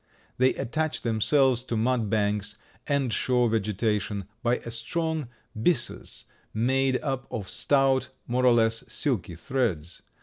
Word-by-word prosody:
They 130 +1 +4
attach 155 +4 -2
themselves 125 +2 +3
to 115 - -2
mud 115 -1 +1
banks 105 -1 0 0.3
and 140 -5 +1
shore 125 -2 +2
vegetation 105 -2 -1 0.2
by 120 +1 +2
a 115 - -7
strong 160 +5 -2 0.3
byssus 120 +4 0 0.3
made 130 +3 +2
up 135 -3 -2
of 105 -4 -5
stout, 135 +2 +2 0.2
more 125 +1 +2
or 125 - +7
less 115 -1 +2
silky 110 - -1
threads. 90 - -2
120 Hz, 130 wpm, -27 LUFS, 110-135 Hz, 0.3 s, or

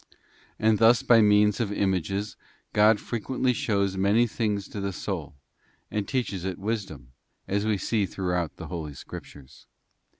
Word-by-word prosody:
And 110 -1 +2
thus 115 +1 +5
by 115 -2 +6
means 105 -1 +4
of 110 -4 -1
images 100 +1 -1 0.4
God 105 0 +5
frequently 125 +2 -1
shows 100 -4 0
many 100 +5 +3
things 105 -3 -2
to 100 - -6
the 100 -1 -2
soul, 80 - -5 0.6
and 105 -1 -2
teaches 110 -9 -2
it 95 -2 -3
wisdom, 95 - -4 0.4
as 100 +2 0
we 105 -2 +2
see 100 +1 0
throughout 90 -4 -2
the - - -7
Holy 80 -5 -5
Scriptures. 70 0 -11
100 Hz, 145 wpm, -26 LUFS, 95-110 Hz, 0.6 s, by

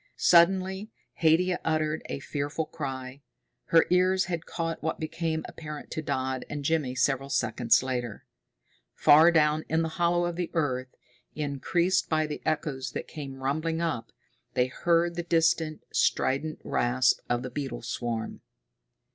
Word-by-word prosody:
Suddenly 190 +4 +4 0.3
Haidia 175 +3 +3
uttered 155 -1 0
a - - -3
fearful 145 +2 -3
cry. 135 -3 -6 0.4
Her 165 -1 +5
ears 185 +1 +3
had 170 -3 -4
caught 165 -1 -3
what 160 +1 -2
became 160 0 -2
apparent 150 -2 -8
to 155 - -3
Dodd 130 -3 -2
and 145 -1 -5
Jimmy 145 -5 0
several 135 +1 +1
seconds 120 -1 +2
later. 125 -4 -4 0.7
Far 160 +4 +7
down 155 -1 +3
in 160 +1 +2
the 160 - -2
hollow 175 0 +2
of 175 -1 -3
the 175 -1 -2
earth, 130 -5 -1 0.4
increased 170 +6 0
by 155 -1 +2
the 150 -1 -5
echoes 150 -4 -2
that - - -5
came 135 -3 -8
rumbling 155 +4 -1
up, 155 -9 -2 0.4
they 125 - +3
heard 170 +6 +1
the 175 - -3
distant, 165 -2 +1
strident 150 +4 +1
rasp 125 +1 +2
of 120 0 0
the 130 - -6
beetle 130 -3 -5
swarm. 115 -1 -4
155 Hz, 145 wpm, -28 LUFS, 130-165 Hz, 0.7 s, Far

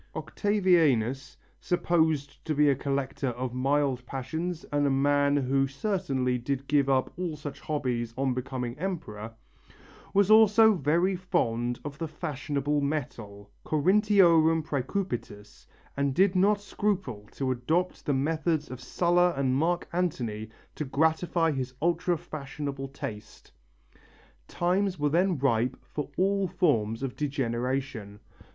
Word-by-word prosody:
Octavianus, 155 - +1 0.2
supposed 160 -5 0
to 155 - -2
be 150 0 +4
a - - +1
collector 135 0 -2
of 125 0 -3
mild 135 0 +1
passions 160 +6 -4
and 145 0 +2
a - - +2
man 145 +1 +2
who 135 0 +1
certainly 135 - -1
did 135 +2 -3
give 140 -1 +2
up 130 -1 +1
all 175 -3 -3
such 145 -1 -7
hobbies 125 -6 -2
on 135 -1 +1
becoming 125 -1 -4
emperor, 115 - -5 0.8
was 200 +1 +3
also 220 0 +7
very 175 +3 +1
fond 120 -10 -1
of 145 0 -7
the 165 - -2
fashionable 150 -2 -2
metal 110 -9 -4
corinthiorum 170 -2 +4
præcupidus 125 - -4 0.3
and 140 -1 0
did 190 +2 +3
not 200 +3 +3
scruple 195 - -3
to 135 -2 -2
adopt 160 +9 -1
the - - -1
methods 155 +2 -1
of 130 0 -7
Sulla 175 +6 +2
and 130 -2 +1
Mark 170 +5 0
Antony 120 -12 -2 0.2
to - - -4
gratify 160 +3 +1
his 130 -2 -4
ultra 175 +1 +1
fashionable 140 -2 -6
taste. 110 -6 -9 1.0
Times 185 +2 0
were 145 -1 +1
then 175 +3 +2
ripe 130 -2 +1
for 150 - -6
all 195 +1 +2
forms 115 - 0
of 130 -2 -3
degeneration. 130 -5 -3
145 Hz, 130 wpm, -28 LUFS, 130-175 Hz, 1.0 s, also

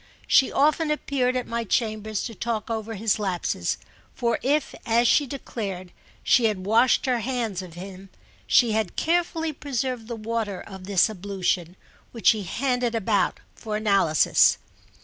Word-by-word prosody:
She 265 - +4
often 305 +2 +2
appeared 270 -4 0
at 250 - -1
my 235 0 -3
chambers 215 -1 -1
to 230 - -5
talk 230 +1 -3
over 225 0 -3
his 215 +1 0
lapses; 190 -4 -1 0.4
for 235 -2 0
if, 290 +2 0
as 235 +1 +3
she 290 +3 +3
declared, 200 -9 -6 0.3
she 245 - +4
had 200 -4 0
washed 225 +5 +3
her 250 -2 +1
hands 230 -5 -2
of 175 -3 -11
him, 190 +1 -9 0.4
she 240 -3 +4
had 215 -4 -1
carefully 330 -1 0
preserved 260 -5 -3
the 235 - -4
water 220 -3 -3
of 190 -1 -10
this 195 -2 +3
ablution, 185 -4 -2 0.4
which 230 - -9
she 220 -2 +2
handed 245 +3 -1
about 205 -4 +1
for 215 -1 -5
analysis. 195 -8 +4
225 Hz, 150 wpm, -25 LUFS, 200-250 Hz, 0.4 s, She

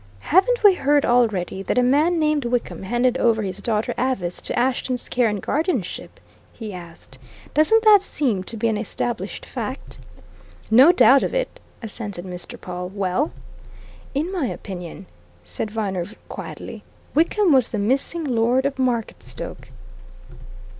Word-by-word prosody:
"Haven't 475 +7 +4
we 410 -2 +8
heard 290 -4 +2
already, 215 -7 +1
that 195 - -2
a 250 - +5
man 300 +7 +3
named 305 -2 +1
Wickham 240 0 -2
handed 240 +5 +1
over 225 -2 +2
his 190 0 -4
daughter 215 0 -1
Avice 215 -9 -1
to - - -4
Ashton's 255 0 -1
care 245 -2 +2
and 210 -1 -2
guardianship?" 320 - -2 0.3
he 215 -3 -7
asked. 170 -6 -12 0.3
"Doesn't 440 +10 +4
that 420 -3 +7
seem 255 - -1
to 230 - -7
be 230 - 0
an 220 -2 0
established 235 +2 -4
fact?" - - -6 0.7
"No 260 +9 +8
doubt 275 -6 +6
of - - -2
it!" - - -2 0.2
assented 205 -4 -5
Mr. 180 -1 -7
Pawle. 180 0 -6
"Well?" 200 - -1 0.8
"In 315 +6 -1
my 345 -9 -1
opinion," 175 - -7 0.4
said 90 - -4
Viner, 195 -5 -2 0.2
quietly, - - -8 0.3
"Wickham 340 +3 +3
was 260 -4 +4
the 220 - -3
missing 270 +10 0
Lord 250 0 +1
of 280 -1 -2
Marketstoke!" 245 -4 -3
240 Hz, 145 wpm, -22 LUFS, 205-290 Hz, 0.8 s, we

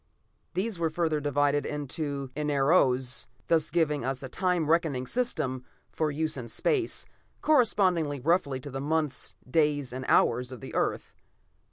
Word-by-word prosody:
These 195 0 -1
were 165 -1 +1
further 160 -1 0
divided 145 0 +1
into 145 -2 -4
enaros, 140 -3 +2 0.2
thus 160 -2 +3
giving 150 -5 +1
us 135 +1 -2
a 130 - -6
time 180 -2 0
reckoning 155 -6 +1
system 155 - -1 0.3
for 155 -1 0
use 155 +1 -1
in 120 -3 -6
space, 355 - 0 0.4
corresponding 185 - +3
roughly 150 -5 +2
to 145 - -8
the 135 +1 -4
months, 155 0 -1
days 145 -2 +1
and 130 +1 -4
hours 125 +2 +3
of 130 - -8
the - - -9
Earth. - - -1
150 Hz, 145 wpm, -28 LUFS, 135-165 Hz, 0.4 s, thus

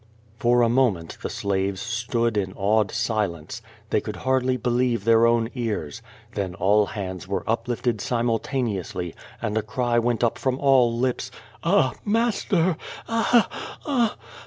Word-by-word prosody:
For 120 -1 +4
a - - +4
moment 115 -9 +1
the - - -3
slaves 95 -1 -1
stood 115 0 -1
in 95 -2 -1
awed 105 +2 +2
silence. 105 -8 -2 0.3
They - - +2
could - - -5
hardly 130 0 +1
believe 120 -2 +1
their 115 +1 +5
own 115 -1 +2
cars. 115 - -3 0.3
Then 95 -3 -3
all 100 +2 +3
hands 95 -4 -5
were 100 - -2
uplifted 120 0 -1
simultjineously 115 - -1 0.3
and 110 -2 -1
a 110 - +2
cry 120 +2 0
went 120 0 0
up 115 - +1
from 130 -1 0
all 135 -4 +4
lips: 125 0 -1 0.3
"Ah, 130 - +3
master! 205 -6 +1 0.3
Ah 230 0 +3
— - - -24
ah - - -8
— - - -25
ah!" 245 -7 +1
115 Hz, 155 wpm, -24 LUFS, 105-130 Hz, 0.3 s, their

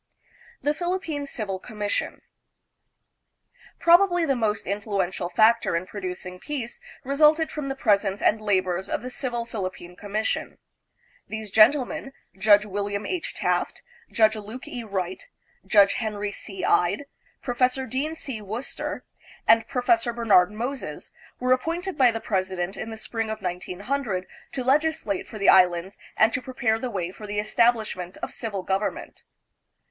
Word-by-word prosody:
The 295 - +2
Philippine 330 -4 -3
Civil 205 -7 -3
Commission. 210 -1 -3 1.6
Probably 350 0 +5
the 275 -3 +2
most 215 -4 0
influential 195 -2 -2
factor 220 +1 +4
in 170 +2 -1
producing 180 -2 -6
peace 255 -3 -5 0.2
resulted 300 +4 +4
from 295 -3 -4
the 270 - -2
presence 200 -5 +2
and 215 +1 +2
labors 190 -3 0
of - - -2
the 255 - -5
Civil 240 -3 -3
Philippine 185 -5 -6
Commission. 210 +3 -2 0.7
These 220 -2 -6
gentlemen, 255 +4 +4 0.2
Judge 205 +1 +5
William 205 0 -3
H. 360 -3 -3
Taft, - - -1 0.3
Judge 220 -1 +4
Luke 215 +4 -8
E. 245 - -5
Wright, 190 - -4 0.4
Judge 200 -2 +6
Henry 210 -2 -2
C. 195 -2 -6
Ide, 195 +10 +2 0.4
Professor 255 +1 +1
Dean 275 +6 -2
C. 265 -8 -6
Worcester, 220 +6 -5 0.4
and 225 0 +5
Professor 255 +1 +2
Bernard 210 -6 +4
Moses, 245 +6 -5 0.3
were 255 0 0
appointed 340 +8 -2
by 260 -4 +5
the 225 -1 -2
presi 190 -4 -1
dent 175 +2 -2
in 225 - -5
the 220 - -7
spring 225 0 -3
of 220 -1 -5
1900 190 +4 -3 0.3
to 260 - -2
legislate 275 -7 +1
for 215 - -8
the 200 - 0
Islands 180 0 +4 0.2
and 220 +1 +5
to 255 - -1
prepare 245 -3 0
the 255 - -3
way 180 -5 -3
for 210 +2 -10
the 205 0 -4
establishment 215 -5 +1
of - - -3
civil 205 -5 -4
government. 195 +3 -2
220 Hz, 145 wpm, -25 LUFS, 195-255 Hz, 1.6 s, Judge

